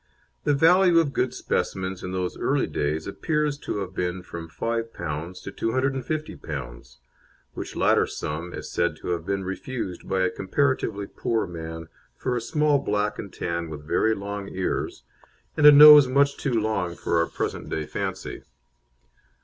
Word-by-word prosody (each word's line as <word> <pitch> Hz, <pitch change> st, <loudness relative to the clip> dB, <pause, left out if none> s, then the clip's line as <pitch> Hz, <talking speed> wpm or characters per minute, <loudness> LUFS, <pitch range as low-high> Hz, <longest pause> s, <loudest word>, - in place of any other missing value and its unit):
The 145 Hz, -, +3 dB
value 175 Hz, +4 st, +5 dB
of 155 Hz, -4 st, +3 dB
good 125 Hz, -1 st, 0 dB
specimens 95 Hz, 0 st, -2 dB
in 90 Hz, -, -5 dB
those 90 Hz, -1 st, -2 dB
early -, -, +1 dB
days 75 Hz, +2 st, -2 dB
appears 150 Hz, +7 st, -1 dB
to 105 Hz, -, -3 dB
have 95 Hz, -1 st, -5 dB
been 90 Hz, 0 st, -2 dB
from 85 Hz, -2 st, -8 dB
P5 90 Hz, -5 st, -4 dB
to 100 Hz, -, -6 dB
P250, 115 Hz, -, -3 dB, 0.6 s
which -, -, -7 dB
latter -, -, +3 dB
sum 80 Hz, +4 st, -5 dB
is -, -, -7 dB
said -, -, 0 dB
to -, -, -7 dB
have 85 Hz, 0 st, -2 dB
been 100 Hz, 0 st, -1 dB
refused 95 Hz, 0 st, -5 dB
by 95 Hz, -1 st, +1 dB
a 95 Hz, -, +2 dB
comparatively 105 Hz, -1 st, 0 dB
poor 115 Hz, +3 st, -1 dB
man 80 Hz, -2 st, -7 dB, 0.3 s
for 125 Hz, -, -2 dB
a 120 Hz, -, -1 dB
small 150 Hz, +3 st, +2 dB
black 105 Hz, -4 st, -1 dB
and 100 Hz, -, -6 dB
tan 85 Hz, -1 st, -3 dB
with 75 Hz, -1 st, -8 dB
very 110 Hz, +6 st, +2 dB
long 100 Hz, 0 st, -5 dB
ears, 95 Hz, -9 st, -3 dB, 0.5 s
and 150 Hz, -1 st, +6 dB
a -, -, +12 dB
nose 150 Hz, -1 st, +10 dB
much 140 Hz, +2 st, +3 dB
too 135 Hz, -, -2 dB
long 100 Hz, -5 st, -1 dB
for 85 Hz, -, 0 dB
our 85 Hz, -, +2 dB
present -, -, -4 dB
day 80 Hz, -, -2 dB
fancy. -, -, -4 dB
100 Hz, 160 wpm, -25 LUFS, 85-130 Hz, 0.6 s, a